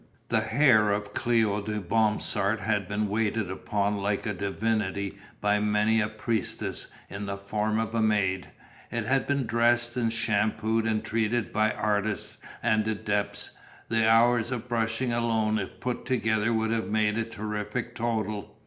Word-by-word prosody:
The 110 Hz, -, +3 dB
hair 110 Hz, -2 st, +4 dB
of 100 Hz, 0 st, -2 dB
Cléo 110 Hz, -4 st, +1 dB
de 105 Hz, 0 st, -2 dB
Bromsart 105 Hz, +1 st, +1 dB
had 105 Hz, -2 st, 0 dB
been 105 Hz, +2 st, -1 dB
waited 105 Hz, -1 st, 0 dB
upon 100 Hz, +1 st, -1 dB
like 100 Hz, +1 st, -1 dB
a 105 Hz, -, -1 dB
divinity 100 Hz, 0 st, -2 dB, 0.2 s
by 105 Hz, 0 st, +2 dB
many 105 Hz, +1 st, +2 dB
a 105 Hz, -, +1 dB
priestess 110 Hz, -1 st, -2 dB, 0.2 s
in 100 Hz, +1 st, -6 dB
the 100 Hz, 0 st, -3 dB
form 105 Hz, +2 st, -1 dB
of 110 Hz, 0 st, -1 dB
a 115 Hz, -, +1 dB
maid. 100 Hz, -4 st, +1 dB, 0.4 s
It 115 Hz, -2 st, -2 dB
had 135 Hz, +2 st, +1 dB
been 140 Hz, -2 st, +1 dB
dressed 120 Hz, +1 st, +2 dB
and 115 Hz, -2 st, +1 dB
shampooed 110 Hz, 0 st, +1 dB
and 110 Hz, -1 st, 0 dB
treated 115 Hz, +1 st, 0 dB
by 110 Hz, 0 st, +3 dB
artists 105 Hz, -1 st, -1 dB, 0.2 s
and 110 Hz, -2 st, +2 dB
adepts, 105 Hz, -1 st, -1 dB, 0.4 s
the 115 Hz, -1 st, +3 dB
hours 120 Hz, 0 st, +4 dB
of 125 Hz, -2 st, -4 dB
brushing 115 Hz, +1 st, 0 dB
alone 110 Hz, -2 st, +1 dB
if 95 Hz, -, -6 dB
put 125 Hz, -1 st, -3 dB
together 110 Hz, -3 st, +1 dB
would 110 Hz, 0 st, +1 dB
have 115 Hz, -1 st, 0 dB
made 105 Hz, 0 st, +1 dB
a -, -, +1 dB
terrific 110 Hz, +1 st, -4 dB
total. 110 Hz, -3 st, -3 dB
110 Hz, 160 wpm, -27 LUFS, 105-115 Hz, 0.4 s, hair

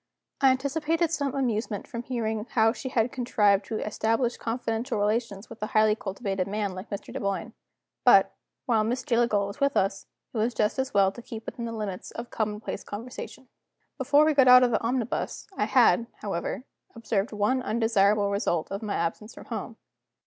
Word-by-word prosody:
I 270 Hz, -, +7 dB
anticipated 305 Hz, +5 st, 0 dB
some 285 Hz, -4 st, -1 dB
amusement 230 Hz, -5 st, -1 dB
from 235 Hz, -4 st, -5 dB
hearing 225 Hz, -3 st, -2 dB
how 225 Hz, -1 st, +3 dB
she 260 Hz, -, -6 dB
had 235 Hz, -1 st, +1 dB
contrived 210 Hz, -5 st, +2 dB
to 220 Hz, -, -3 dB
establish 225 Hz, +3 st, 0 dB
confidential 230 Hz, 0 st, -2 dB
relations 210 Hz, 0 st, -1 dB
with 230 Hz, -1 st, -12 dB
a 215 Hz, -, -1 dB
highly 215 Hz, 0 st, +5 dB
cultivated 195 Hz, -2 st, -3 dB
man 205 Hz, -1 st, -2 dB
like 185 Hz, +3 st, -8 dB
Mr. 200 Hz, -, -6 dB
Dunboyne. 200 Hz, +3 st, -3 dB, 0.5 s
But, -, -, +6 dB, 0.3 s
while 230 Hz, -5 st, +2 dB
Miss 245 Hz, +4 st, -1 dB
Jillgall 230 Hz, -4 st, +2 dB
was 200 Hz, 0 st, -8 dB
with 280 Hz, 0 st, +2 dB
us, 195 Hz, 0 st, 0 dB, 0.3 s
it 230 Hz, -, -2 dB
was 230 Hz, +3 st, 0 dB
just 215 Hz, +5 st, 0 dB
as 265 Hz, 0 st, -1 dB
well 195 Hz, -1 st, +4 dB
to 240 Hz, -, -11 dB
keep 225 Hz, -1 st, -8 dB
within 235 Hz, -, -5 dB
the 230 Hz, -, -4 dB
limits 210 Hz, -5 st, -5 dB
of 235 Hz, +1 st, -8 dB
commonplace 210 Hz, -1 st, -3 dB
conversation. 250 Hz, +4 st, -8 dB, 0.5 s
Before 285 Hz, +3 st, +4 dB
we 310 Hz, -, +3 dB
got 270 Hz, -3 st, +5 dB
out 250 Hz, 0 st, +9 dB
of 245 Hz, -, +3 dB
the 220 Hz, -, +1 dB
omnibus 240 Hz, 0 st, -2 dB
I -, -, +1 dB
had, 235 Hz, -, +4 dB, 0.2 s
however, 195 Hz, +3 st, -3 dB, 0.3 s
observed 220 Hz, -2 st, -1 dB
one 210 Hz, +5 st, +1 dB
undesirable 210 Hz, -3 st, +2 dB
result 195 Hz, -5 st, -1 dB
of 195 Hz, -, -3 dB
my 210 Hz, -2 st, -3 dB
absence 170 Hz, +7 st, -3 dB
from -, -, -11 dB
home. -, -, -6 dB
225 Hz, 180 wpm, -27 LUFS, 205-250 Hz, 0.5 s, out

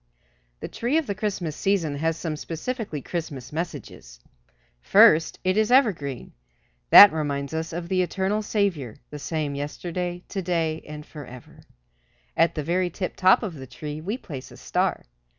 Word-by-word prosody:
The -, -, -4 dB
tree 245 Hz, +7 st, -1 dB
of 320 Hz, -, +1 dB
the 205 Hz, -, -2 dB
Christmas 190 Hz, -6 st, -3 dB
season 170 Hz, -7 st, 0 dB
has 160 Hz, +2 st, 0 dB
some 160 Hz, -2 st, -3 dB
specifically 165 Hz, -, -5 dB
Christmas 145 Hz, -7 st, -5 dB
messages. 145 Hz, -, -6 dB, 0.6 s
First, 155 Hz, -, +5 dB
it 185 Hz, +2 st, +1 dB
is 215 Hz, +2 st, +2 dB
evergreen. 185 Hz, -, +1 dB, 0.6 s
That 205 Hz, -3 st, +11 dB
reminds 145 Hz, -2 st, -2 dB
us 160 Hz, +1 st, -3 dB
of 170 Hz, +1 st, -5 dB
the 185 Hz, +1 st, +1 dB
eternal 190 Hz, +3 st, -1 dB
Saviour, 190 Hz, -, -1 dB, 0.2 s
"the 150 Hz, -, -7 dB
same 150 Hz, -1 st, -3 dB
yesterday, 175 Hz, +5 st, -4 dB
to 195 Hz, -, -3 dB
day 165 Hz, -3 st, -1 dB
and 150 Hz, 0 st, -8 dB
forever." 125 Hz, -6 st, -12 dB, 0.7 s
At 165 Hz, +1 st, +3 dB
the 155 Hz, -, -2 dB
very 175 Hz, +3 st, 0 dB
tiptop 185 Hz, +3 st, +2 dB
of 200 Hz, -5 st, -4 dB
the 135 Hz, -4 st, -9 dB
tree 150 Hz, +3 st, -7 dB
we 205 Hz, +9 st, -3 dB
place 140 Hz, -, -9 dB
a -, -, -14 dB
star. -, -, -1 dB
165 Hz, 155 wpm, -25 LUFS, 150-190 Hz, 0.7 s, That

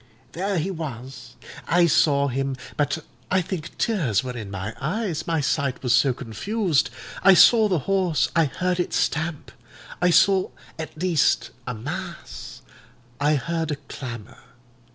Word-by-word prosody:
There 195 Hz, +2 st, -2 dB
he 175 Hz, +4 st, -1 dB
was: 135 Hz, -6 st, -7 dB, 0.3 s
I 175 Hz, +1 st, +4 dB
saw 145 Hz, -4 st, +3 dB
him; 135 Hz, 0 st, -2 dB, 0.2 s
but 150 Hz, +1 st, -1 dB, 0.2 s
I 190 Hz, -, +3 dB
think 170 Hz, -2 st, -6 dB
tears 155 Hz, -, +1 dB
were 125 Hz, -1 st, -5 dB
in 110 Hz, -4 st, -6 dB
my 100 Hz, +2 st, -5 dB
eyes, 180 Hz, -, -2 dB
my 165 Hz, -2 st, +1 dB
sight 140 Hz, -2 st, -1 dB
was 125 Hz, -, +2 dB
so 135 Hz, -, +4 dB
confused. 155 Hz, -, -1 dB, 0.3 s
I 195 Hz, 0 st, +8 dB
saw 220 Hz, +3 st, +7 dB
the 185 Hz, -4 st, +1 dB
horse; 190 Hz, -5 st, +1 dB
I 165 Hz, -1 st, +5 dB
heard 180 Hz, +5 st, -1 dB
it 175 Hz, -, -1 dB
stamp—I 155 Hz, 0 st, -2 dB
saw 190 Hz, +2 st, +4 dB, 0.3 s
at 155 Hz, -1 st, -6 dB
least 175 Hz, -3 st, +2 dB, 0.2 s
a 125 Hz, -, -3 dB
mass; 60 Hz, -, -7 dB, 0.6 s
I 150 Hz, +1 st, +3 dB
heard 165 Hz, +3 st, -2 dB
a 150 Hz, -, 0 dB
clamour. 125 Hz, -5 st, -9 dB
155 Hz, 145 wpm, -24 LUFS, 130-180 Hz, 0.6 s, I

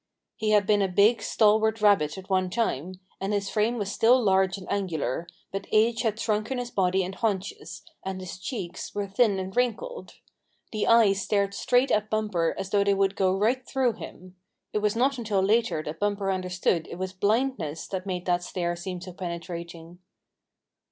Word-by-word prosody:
He 220 Hz, -, -2 dB
had 210 Hz, -2 st, +4 dB
been 205 Hz, 0 st, +3 dB
a 195 Hz, -, +2 dB
big, 205 Hz, +5 st, +4 dB
stalwart 220 Hz, +1 st, +3 dB
rabbit 195 Hz, -7 st, +3 dB
at 190 Hz, 0 st, -9 dB
one 185 Hz, -1 st, +1 dB
time, 185 Hz, -, -1 dB, 0.2 s
and 195 Hz, +2 st, -2 dB
his 200 Hz, -1 st, -1 dB
frame 225 Hz, +3 st, +1 dB
was 200 Hz, -3 st, -2 dB
still 245 Hz, +3 st, +4 dB
large 190 Hz, -3 st, +2 dB
and 190 Hz, -, -10 dB
angular, 165 Hz, -6 st, -2 dB, 0.2 s
but 195 Hz, 0 st, -5 dB
age 225 Hz, +2 st, +3 dB
had 220 Hz, -2 st, -1 dB
shrunken 215 Hz, +4 st, -1 dB
his 245 Hz, -1 st, -4 dB
body 190 Hz, -2 st, +2 dB
and 185 Hz, +2 st, -5 dB
haunches, 200 Hz, -2 st, -3 dB, 0.2 s
and 190 Hz, 0 st, -4 dB
his 185 Hz, -1 st, -8 dB
cheeks 190 Hz, -5 st, -6 dB
were 205 Hz, -1 st, -1 dB
thin 200 Hz, 0 st, +2 dB
and 190 Hz, 0 st, -5 dB
wrinkled. 460 Hz, -, -2 dB, 0.6 s
The 215 Hz, -2 st, -1 dB
eyes 215 Hz, -4 st, +5 dB
stared 200 Hz, 0 st, 0 dB
straight 245 Hz, +6 st, +2 dB
at 215 Hz, 0 st, +1 dB
Bumper 210 Hz, -7 st, 0 dB
as 195 Hz, -, -5 dB
though 200 Hz, -1 st, +3 dB
they 200 Hz, 0 st, +2 dB
would 195 Hz, 0 st, +1 dB
go 190 Hz, 0 st, +2 dB
right 240 Hz, +6 st, +1 dB
through 260 Hz, -2 st, 0 dB
him. 185 Hz, -2 st, -11 dB, 0.4 s
It 210 Hz, -, +1 dB
was 210 Hz, 0 st, 0 dB
not 260 Hz, +2 st, +1 dB
until 215 Hz, -4 st, 0 dB
later 205 Hz, -4 st, +2 dB
that 150 Hz, +1 st, -6 dB
Bumper 205 Hz, -1 st, 0 dB
understood 180 Hz, -2 st, -1 dB
it -, -, -8 dB
was 185 Hz, 0 st, -4 dB
blindness 200 Hz, -, -1 dB
that 190 Hz, 0 st, -4 dB
made 180 Hz, -2 st, -3 dB
that 175 Hz, -1 st, +1 dB
stare 175 Hz, -1 st, -2 dB
seem 180 Hz, +1 st, -5 dB
so 185 Hz, 0 st, -8 dB
penetrating. 170 Hz, -1 st, -7 dB
195 Hz, 185 wpm, -26 LUFS, 185-220 Hz, 0.6 s, eyes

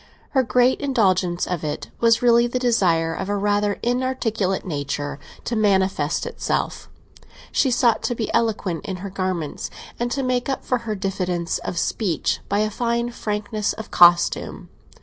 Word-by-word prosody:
Her 265 Hz, -, +3 dB
great 250 Hz, +3 st, +2 dB
indulgence 190 Hz, -10 st, +1 dB
of 180 Hz, -3 st, -3 dB
it 150 Hz, -1 st, -4 dB
was 230 Hz, 0 st, +3 dB
really 235 Hz, 0 st, +5 dB
the 240 Hz, -, -2 dB
desire 180 Hz, -10 st, +2 dB
of 190 Hz, -, -4 dB
a 205 Hz, -, 0 dB
rather 205 Hz, 0 st, +1 dB
inarticulate 240 Hz, -6 st, 0 dB
nature 145 Hz, -3 st, -3 dB, 0.3 s
to 235 Hz, -, -2 dB
manifest 190 Hz, -7 st, +1 dB
itself; 475 Hz, -, -3 dB, 0.6 s
she 270 Hz, -, +2 dB
sought 240 Hz, -2 st, +3 dB
to 245 Hz, -, -1 dB
be 225 Hz, -2 st, -3 dB
eloquent 210 Hz, -7 st, 0 dB
in 190 Hz, -, -4 dB
her 195 Hz, -, -5 dB
garments, 185 Hz, -5 st, -3 dB, 0.3 s
and 240 Hz, 0 st, 0 dB
to 270 Hz, +3 st, -1 dB
make 255 Hz, 0 st, 0 dB
up 270 Hz, -, -3 dB
for 250 Hz, -, +1 dB
her 215 Hz, -, 0 dB
diffidence 185 Hz, -3 st, -2 dB
of 175 Hz, -, -5 dB
speech 180 Hz, -5 st, 0 dB
by 205 Hz, +1 st, +2 dB
a 215 Hz, 0 st, 0 dB
fine 235 Hz, +1 st, -1 dB
frankness 210 Hz, -1 st, -2 dB
of 220 Hz, -, -9 dB
costume. 175 Hz, 0 st, +4 dB
210 Hz, 160 wpm, -22 LUFS, 185-240 Hz, 0.6 s, really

